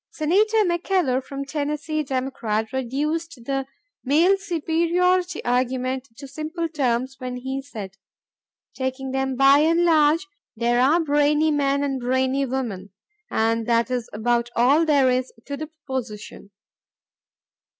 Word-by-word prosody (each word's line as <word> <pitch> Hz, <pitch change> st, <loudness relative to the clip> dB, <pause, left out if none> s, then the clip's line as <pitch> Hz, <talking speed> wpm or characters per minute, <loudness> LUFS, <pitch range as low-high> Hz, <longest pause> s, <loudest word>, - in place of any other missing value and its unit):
Senator 425 Hz, +8 st, +2 dB
McKellar 345 Hz, -6 st, +1 dB
of 275 Hz, 0 st, -5 dB
Tennessee, 300 Hz, +1 st, -2 dB
Democrat, 255 Hz, -5 st, -2 dB
reduced 280 Hz, +2 st, -3 dB
the 270 Hz, 0 st, -2 dB, 0.4 s
male 325 Hz, +8 st, +4 dB
superiority 355 Hz, 0 st, 0 dB
argument 255 Hz, +1 st, -1 dB
to 275 Hz, -, -9 dB
simple 310 Hz, +4 st, -4 dB
terms 265 Hz, -4 st, -1 dB
when 255 Hz, -1 st, -5 dB
he 265 Hz, +2 st, -4 dB
said: 210 Hz, -8 st, -9 dB, 0.4 s
"... -, -, -52 dB
Taking 260 Hz, 0 st, -3 dB
them 265 Hz, 0 st, -1 dB
by 275 Hz, +2 st, +6 dB
and 335 Hz, +3 st, +3 dB
large, 320 Hz, +1 st, +4 dB, 0.3 s
there 240 Hz, +2 st, +1 dB
are 290 Hz, +7 st, +4 dB
brainy 300 Hz, 0 st, +2 dB
men 280 Hz, -1 st, +1 dB
and 270 Hz, -2 st, -1 dB
brainy 260 Hz, +2 st, +1 dB
women, 230 Hz, -7 st, -4 dB, 0.4 s
and 225 Hz, +1 st, 0 dB
that 235 Hz, +1 st, +2 dB
is 245 Hz, -2 st, -2 dB
about 235 Hz, +2 st, 0 dB
all 280 Hz, +7 st, +4 dB
there 275 Hz, -4 st, +4 dB
is 255 Hz, 0 st, -1 dB
to 285 Hz, -, -4 dB
the 310 Hz, +2 st, -6 dB
proposition." 260 Hz, -11 st, -7 dB
275 Hz, 130 wpm, -23 LUFS, 250-310 Hz, 0.4 s, by